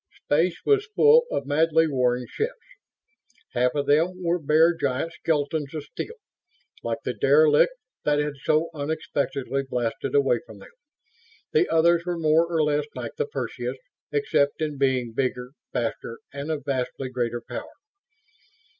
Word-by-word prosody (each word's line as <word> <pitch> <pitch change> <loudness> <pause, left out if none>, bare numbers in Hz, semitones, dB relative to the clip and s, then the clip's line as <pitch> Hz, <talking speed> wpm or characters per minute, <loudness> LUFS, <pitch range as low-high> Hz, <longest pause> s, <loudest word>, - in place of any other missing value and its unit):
Space 165 +4 +2
was 415 +1 +3
full 475 +2 +6
of 140 - -2
madly 160 +3 +3
warring 125 -4 +1
ships. 465 +2 -4 0.9
Half 125 +2 +1
of 145 -1 0
them 165 +6 +2
were 175 +1 +1
bare, 160 +3 +4
giant 140 +3 -2
skeletons 150 -1 -1
of 155 - -4
steel, 455 - -7 0.7
like - - -2
the - - -1
"derelict" 470 +2 +4 0.3
that 150 0 +2
had 150 0 0
so 155 +2 +1
unexpectedly 140 -3 -2
blasted 125 -3 -3
away 135 -4 +3
from 110 - -13
them. 100 - -14 0.8
The 435 -5 +3
others 170 +1 +4
were 175 0 -2
more 160 +1 +3
or 160 -2 +2
less 150 0 0
like - - -5
the 460 - -1
Perseus, 440 - -4 0.3
except 425 - +1
in 150 -3 -3
being 130 -4 +1
bigger, 125 0 -2 0.2
faster 115 -1 -3 0.2
and 140 +2 -5
of 150 -3 -3
vastly 130 -1 -2
greater 120 -2 -2
power. - - -6
150 Hz, 145 wpm, -25 LUFS, 135-165 Hz, 0.9 s, full